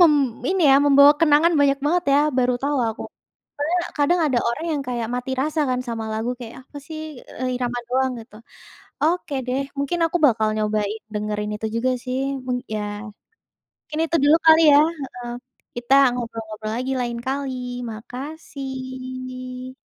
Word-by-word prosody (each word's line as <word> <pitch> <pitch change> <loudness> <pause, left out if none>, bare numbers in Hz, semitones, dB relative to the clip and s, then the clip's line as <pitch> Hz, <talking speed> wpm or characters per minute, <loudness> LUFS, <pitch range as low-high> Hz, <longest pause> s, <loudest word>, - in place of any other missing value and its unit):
mem 340 -3 +8 0.4
ini 380 -1 +1
ya, - - +7
membawa 280 0 +8
kenangan 325 +1 +5
banyak 280 -1 +3
banget 355 +3 +2
ya, 280 - +5 0.2
baru 250 0 +3
tahu 285 +1 0
aku. 220 - -5 0.6
Karena 300 +4 0 0.2
kadang 295 +5 +3
ada 265 -5 +1
orang 235 +8 -2
yang 295 -2 -1
kayak 240 -2 -2
mati 250 +1 -4
rasa 310 +2 -1
kan 250 0 0
sama 225 -1 -3
lagu, 220 +2 -2
kayak 235 -2 -8
apa 285 - -12
sih, 315 -1 -6 0.4
eee, 255 - -1
irama 245 -1 -2
doang 260 +1 +1
gitu. 220 -1 -14 0.7
Oke 320 -2 0
deh, 255 +2 0 0.2
mungkin 280 +5 -1
aku 330 - -1
bakal 220 -4 +2
nyobain 215 0 -1
dengerin 210 0 -2
itu 215 +1 -4
juga 250 +3 +1
sih 255 0 -2 0.3
mung 250 -1 0 0.2
ya. 215 - -1 1.0
Mungkin 305 +1 -5
itu 330 +1 +1
dulu 295 +2 +6
kali 320 0 +8
ya, 285 - +8 0.3
heeh. 245 -2 -7 0.4
Kita 240 +2 +2 0.2
ngobrol-ngobrol 225 -3 -5
lagi 255 +2 -2
lain 240 -1 -2
kali. 270 0 -2 0.4
Makasih. 255 0 -7
255 Hz, 160 wpm, -22 LUFS, 235-290 Hz, 1.0 s, mem